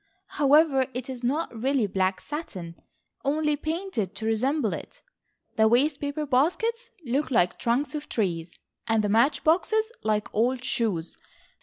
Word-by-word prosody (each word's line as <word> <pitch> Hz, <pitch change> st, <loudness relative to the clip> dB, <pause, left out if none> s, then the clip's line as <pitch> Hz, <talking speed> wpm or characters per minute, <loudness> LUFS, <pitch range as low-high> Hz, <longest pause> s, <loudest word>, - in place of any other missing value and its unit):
However 285 Hz, -2 st, +5 dB
it 255 Hz, +1 st, -4 dB
is 250 Hz, -1 st, -8 dB
not 280 Hz, +2 st, -1 dB
really 260 Hz, +1 st, +1 dB
black 190 Hz, -1 st, 0 dB
satin, 195 Hz, -, -6 dB, 0.5 s
only 300 Hz, +2 st, +1 dB
painted 310 Hz, -, -3 dB
to 220 Hz, -, -5 dB
resemble 255 Hz, +7 st, +1 dB
it. -, -, -9 dB, 0.5 s
The 220 Hz, 0 st, +5 dB
waste 275 Hz, +6 st, +3 dB
paper 290 Hz, +1 st, -2 dB
baskets 445 Hz, -, +1 dB, 0.2 s
look 265 Hz, +4 st, 0 dB
like 180 Hz, -9 st, +2 dB
trunks 255 Hz, +5 st, 0 dB
of 300 Hz, -1 st, -5 dB
trees, 175 Hz, -6 st, -2 dB, 0.3 s
and 225 Hz, -1 st, +2 dB
the 205 Hz, -, 0 dB
match 230 Hz, +8 st, +3 dB
boxes 435 Hz, +8 st, +2 dB
like 210 Hz, -1 st, -1 dB
old 245 Hz, +3 st, +1 dB
shoes. 205 Hz, -11 st, -1 dB
260 Hz, 145 wpm, -26 LUFS, 220-300 Hz, 0.5 s, However